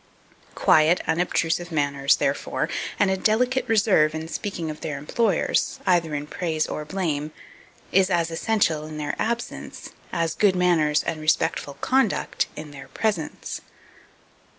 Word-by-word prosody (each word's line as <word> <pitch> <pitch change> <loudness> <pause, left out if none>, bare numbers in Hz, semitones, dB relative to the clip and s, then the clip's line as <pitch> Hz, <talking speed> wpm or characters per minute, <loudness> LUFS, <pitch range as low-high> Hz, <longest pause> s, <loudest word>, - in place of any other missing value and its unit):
Quiet 160 +3 +4
unobtrusive 170 0 0
manners, 140 -3 +2
therefore, - - -1 0.3
and 200 -2 +3
a 190 - +1
delicate 250 +6 +1
reserve 195 -8 +4
in 160 0 -4
speaking 170 -2 -4
of 150 - -10
their 150 -3 -3
employers, 190 +7 0
either 170 -4 +2
in 145 0 -3
praise 160 -1 -1
or 150 - -4
blame, 155 -4 -2 0.6
is 190 0 +4
as 170 -2 +1
essential 165 -4 0
in 155 -1 -7
their 150 -1 -3
absence, 235 +1 -4 0.2
as 165 -1 0
good 200 -3 +3
manners 165 -5 +3
and 155 -2 -3
respectful 155 -2 0
conduct 260 -6 +1
in 150 -1 -8
their 140 -1 -10
presence. 205 -9 -3
165 Hz, 135 wpm, -24 LUFS, 155-190 Hz, 0.6 s, Quiet